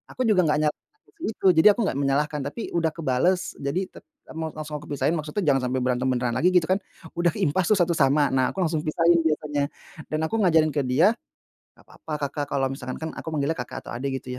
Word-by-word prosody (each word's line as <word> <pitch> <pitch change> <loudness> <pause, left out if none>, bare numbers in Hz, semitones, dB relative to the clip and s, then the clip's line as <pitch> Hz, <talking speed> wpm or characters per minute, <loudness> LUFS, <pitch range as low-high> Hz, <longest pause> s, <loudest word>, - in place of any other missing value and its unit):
Aku - - -4
juga 215 -6 +4
enggak 150 0 +2
nyalahin 150 -1 0 0.2
anak 430 - -44
kecil 330 - -8
itu 215 - -5
jadi 160 - +7
aku - - -8
enggak 195 - -1
menyalahkan 145 +2 0
tapi 190 +11 -6
udah 165 -2 0
kebales, 165 +4 +1 0.2
jadi 140 +5 -1
te - - -12 0.3
mau 160 0 -4
aku 155 - -10
langsung 150 0 -7
pisahin 140 0 0
maksudnya 155 +6 -3
jangan 140 -4 +3
sampai 130 +1 -1
berantem 125 0 0
beneran 125 -2 0
lagi 175 - +3
gitu 180 - +5
kan. 190 - +3 0.4
Udah 170 -2 +2
ke 205 - -1
impas 175 +3 +1
tuh 215 - +4
1 175 -3 +2
sama. 145 -2 +3
Nah 130 -1 +1
aku 190 - 0
langsung 160 -2 0
pisahin 170 +2 +3
biasanya. 150 -2 -1 0.4
Dan 155 - -2
aku 225 +8 -1
ngajarin 160 -6 +4
ke 145 - -1
dia, 155 +11 +4 0.6
"Enggak - - -21
apa-apa 160 - -9 0.2
Kakak, 145 -1 -3
kalo 140 -2 -1
misalkan" 130 -1 -6
kan 160 - -3
aku - - -11
manggilnya 145 +1 0
kakak 125 - -6
atau - - -9
adik 130 +2 -3
gitu 125 - -8
150 Hz, 235 wpm, -25 LUFS, 135-170 Hz, 0.6 s, jadi